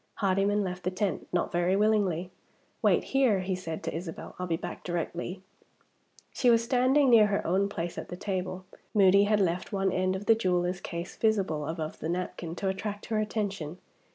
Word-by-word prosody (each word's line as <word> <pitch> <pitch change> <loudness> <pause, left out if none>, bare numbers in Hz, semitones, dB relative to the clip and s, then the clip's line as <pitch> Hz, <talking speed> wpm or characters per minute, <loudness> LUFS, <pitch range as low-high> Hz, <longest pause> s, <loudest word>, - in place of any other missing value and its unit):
Hardyman 200 +1 +1
left 180 -1 -4
the 180 - -1
tent, 185 +1 -2
not 175 - 0
very 175 +2 +2
willingly. 195 -4 +1 0.5
"Wait - - +3
here," 255 -8 +2
he 185 +1 -2
said 165 -3 -5
to - - -3
Isabel; 165 0 -6
"I'll 180 - -2
be 165 -1 0
back 175 +1 -7
directly." 175 +2 -4 0.9
She 250 - +3
was 230 -1 +5
standing 255 +3 +3
near 220 -3 +7
her 200 -1 -1
own 195 +3 +2
place 175 -3 -4
at - - -8
the 180 - -6
table. 185 -1 -3 0.3
Moody 200 0 +6
had 210 0 +2
left 180 -2 0
one 195 -2 +1
end 185 +1 +1
of 195 +2 -5
the 225 - +6
jeweler's 180 -4 0
case 170 +2 -6
visible 190 -9 +1
above 160 -1 -4
the 160 - -3
napkin, 175 -1 -3
to 195 - -3
attract 205 +2 -3
her 215 - +2
attention. 200 -7 -3
190 Hz, 185 wpm, -29 LUFS, 175-205 Hz, 0.9 s, near